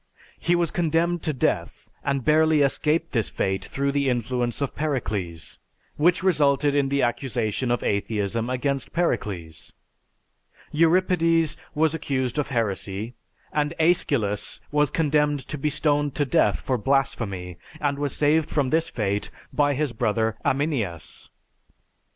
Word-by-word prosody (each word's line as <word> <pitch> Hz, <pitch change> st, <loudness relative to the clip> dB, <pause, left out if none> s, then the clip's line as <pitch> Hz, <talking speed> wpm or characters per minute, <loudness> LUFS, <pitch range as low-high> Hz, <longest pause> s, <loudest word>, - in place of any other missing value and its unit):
He 175 Hz, -, +2 dB
was 170 Hz, -2 st, +1 dB
condemned 170 Hz, +1 st, +1 dB
to 155 Hz, -, -1 dB
death 135 Hz, -, -1 dB, 0.2 s
and 140 Hz, -2 st, -1 dB
barely 155 Hz, 0 st, +4 dB
escaped 155 Hz, +4 st, +1 dB
this 115 Hz, -5 st, 0 dB
fate 95 Hz, 0 st, -1 dB
through 140 Hz, +1 st, -1 dB
the 140 Hz, -1 st, +1 dB
influence 120 Hz, 0 st, -1 dB
of 140 Hz, -2 st, -2 dB
Pericles; 100 Hz, -, -3 dB, 0.4 s
which 175 Hz, +4 st, +3 dB
resulted 145 Hz, -5 st, +3 dB
in 140 Hz, -1 st, +2 dB
the 140 Hz, 0 st, +1 dB
accusation 120 Hz, -1 st, -1 dB
of 120 Hz, -2 st, 0 dB
atheism 105 Hz, +2 st, -1 dB
against 135 Hz, +1 st, -2 dB
Pericles. 100 Hz, -, -2 dB, 1.0 s
Euripides 165 Hz, -1 st, +3 dB, 0.2 s
was 155 Hz, +1 st, +2 dB
accused 135 Hz, -4 st, -1 dB
of 145 Hz, -, 0 dB
heresy, 110 Hz, -1 st, -2 dB, 0.4 s
and 150 Hz, +2 st, 0 dB
Aeschylus 140 Hz, -, +1 dB
was 150 Hz, -1 st, +3 dB
condemned 150 Hz, -2 st, +1 dB
to 155 Hz, -, -4 dB
be 150 Hz, -, +1 dB
stoned 145 Hz, -1 st, 0 dB
to 145 Hz, -, +1 dB
death 160 Hz, +5 st, +2 dB
for 130 Hz, -2 st, -1 dB
blasphemy 105 Hz, -9 st, -1 dB, 0.2 s
and 145 Hz, -2 st, -1 dB
was 145 Hz, -1 st, -2 dB
saved 150 Hz, +1 st, +2 dB
from 140 Hz, -4 st, 0 dB
this 165 Hz, +1 st, +2 dB
fate 105 Hz, -3 st, -2 dB, 0.2 s
by 145 Hz, -1 st, +2 dB
his 145 Hz, -3 st, -1 dB
brother 110 Hz, -1 st, 0 dB
Aminias. 130 Hz, -, -2 dB
140 Hz, 135 wpm, -24 LUFS, 115-155 Hz, 1.0 s, barely